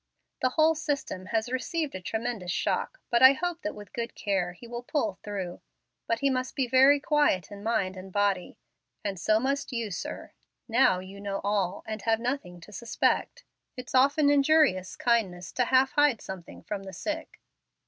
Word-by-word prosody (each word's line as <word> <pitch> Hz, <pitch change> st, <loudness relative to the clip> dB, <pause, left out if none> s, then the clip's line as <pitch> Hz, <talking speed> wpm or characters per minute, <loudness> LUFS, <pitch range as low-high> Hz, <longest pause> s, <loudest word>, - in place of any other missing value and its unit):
The 255 Hz, -, +3 dB
whole 315 Hz, +4 st, +4 dB
system 280 Hz, -11 st, -3 dB
has 225 Hz, +2 st, -1 dB
received 300 Hz, +4 st, -2 dB
a 185 Hz, -, -6 dB
tremendous 220 Hz, -2 st, -3 dB
shock, -, -, -1 dB
but 235 Hz, -, +3 dB
I 260 Hz, +1 st, +10 dB
hope 350 Hz, +3 st, -3 dB
that 205 Hz, -, -4 dB
with 205 Hz, -1 st, -12 dB
good 235 Hz, 0 st, -4 dB
care 190 Hz, -3 st, -1 dB
he 180 Hz, -, -14 dB
will 240 Hz, 0 st, -5 dB
pull 225 Hz, -, -2 dB
through. 195 Hz, -4 st, -5 dB, 0.5 s
But 230 Hz, -, 0 dB
he 275 Hz, -, +3 dB
must 255 Hz, 0 st, -2 dB
be 270 Hz, -, +1 dB
kept 240 Hz, -, -13 dB
very 270 Hz, +2 st, +6 dB
quiet 290 Hz, -, +1 dB
in 200 Hz, 0 st, -9 dB
mind 205 Hz, -4 st, 0 dB
and 190 Hz, +1 st, -9 dB
body. 200 Hz, -2 st, 0 dB, 0.5 s
And 195 Hz, -3 st, -3 dB
so 215 Hz, +4 st, +3 dB
must 275 Hz, +3 st, -1 dB
you, 230 Hz, -4 st, -3 dB
sir. 175 Hz, -, -6 dB, 0.4 s
Now 235 Hz, -5 st, +4 dB
you 195 Hz, +2 st, -10 dB
know 200 Hz, -1 st, -3 dB
all, 200 Hz, -2 st, 0 dB
and 215 Hz, -1 st, -5 dB
have 225 Hz, +1 st, +1 dB
nothing 235 Hz, -8 st, -3 dB
to 190 Hz, -, -13 dB
suspect. 230 Hz, +3 st, -1 dB, 0.3 s
It's 250 Hz, 0 st, -8 dB
often 285 Hz, +3 st, +4 dB
injurious 280 Hz, -10 st, +3 dB
kindness 185 Hz, -8 st, 0 dB
to 250 Hz, -, +1 dB
half 260 Hz, +2 st, +4 dB
hide 290 Hz, -6 st, +3 dB
something 190 Hz, -3 st, -9 dB
from 205 Hz, -2 st, -4 dB
the 190 Hz, -1 st, -9 dB
sick." 320 Hz, +6 st, -5 dB
230 Hz, 185 wpm, -28 LUFS, 195-270 Hz, 0.5 s, I